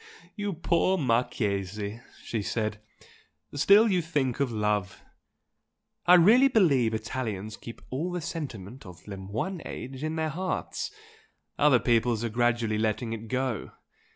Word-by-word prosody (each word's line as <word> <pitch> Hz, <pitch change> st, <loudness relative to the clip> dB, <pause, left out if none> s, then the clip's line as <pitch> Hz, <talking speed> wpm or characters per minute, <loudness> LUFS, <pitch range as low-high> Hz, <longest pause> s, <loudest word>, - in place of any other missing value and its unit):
"You 205 Hz, -2 st, -2 dB
poor 170 Hz, +3 st, +1 dB
Marchese!" 105 Hz, -, -1 dB, 0.2 s
she 110 Hz, -, -2 dB
said 105 Hz, 0 st, -2 dB, 0.7 s
"Still 200 Hz, +10 st, +6 dB
you 185 Hz, -4 st, +2 dB
think 145 Hz, -7 st, -1 dB
of 140 Hz, -3 st, +1 dB
love! 105 Hz, -4 st, -1 dB, 1.0 s
I 180 Hz, -, +9 dB
really 220 Hz, +10 st, +7 dB
believe 140 Hz, -, +3 dB
Italians 110 Hz, -3 st, -4 dB
keep 115 Hz, -, -11 dB
all 155 Hz, +8 st, -2 dB
the 180 Hz, -, -2 dB
sentiment 130 Hz, -, -6 dB
of 90 Hz, -2 st, -13 dB
le 100 Hz, -1 st, -6 dB
moyen 110 Hz, -, -4 dB
age 130 Hz, +2 st, -7 dB
in 155 Hz, +1 st, -2 dB
their 160 Hz, -1 st, -1 dB
hearts, 185 Hz, +4 st, -3 dB, 0.7 s
other 145 Hz, -3 st, +6 dB
peoples 115 Hz, -1 st, +2 dB
are 115 Hz, -, -1 dB
gradually 115 Hz, -1 st, +1 dB
letting 110 Hz, +1 st, -1 dB
it 115 Hz, 0 st, -7 dB
go. 130 Hz, -3 st, -2 dB
120 Hz, 135 wpm, -28 LUFS, 110-160 Hz, 1.0 s, I